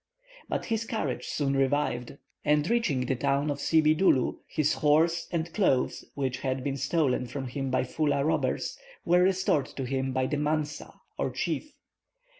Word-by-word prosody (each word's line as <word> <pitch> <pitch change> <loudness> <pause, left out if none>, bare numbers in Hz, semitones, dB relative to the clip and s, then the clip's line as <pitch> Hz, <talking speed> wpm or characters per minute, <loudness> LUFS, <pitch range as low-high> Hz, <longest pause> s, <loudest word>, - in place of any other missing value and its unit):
But - - -2
his 225 0 -1
courage 145 - -3
soon 140 -2 0
revived; 135 -2 0 0.3
and 150 +1 +2
reaching 230 - +1
the 130 - 0
town 140 +3 +1
of 140 - -4
Sibidoulou, 155 -2 +3
his 155 -2 +1
horse 165 +3 +2
and 165 -1 -2
clothes, 135 -11 +1
which 130 -2 -2
had 130 -1 -2
been 135 0 -1
stolen 135 -5 +1
from 135 +2 -5
him 135 +1 -3
by 130 - +1
Foulah 145 +1 0
robbers, 160 0 -1 0.3
were 175 +1 +4
restored 185 -6 +2
to 135 - -6
him 130 +1 -1
by 130 0 0
the 150 - -1
mansa, 150 0 -2 0.3
or - - 0
chief. - - -3
145 Hz, 160 wpm, -28 LUFS, 130-160 Hz, 0.3 s, were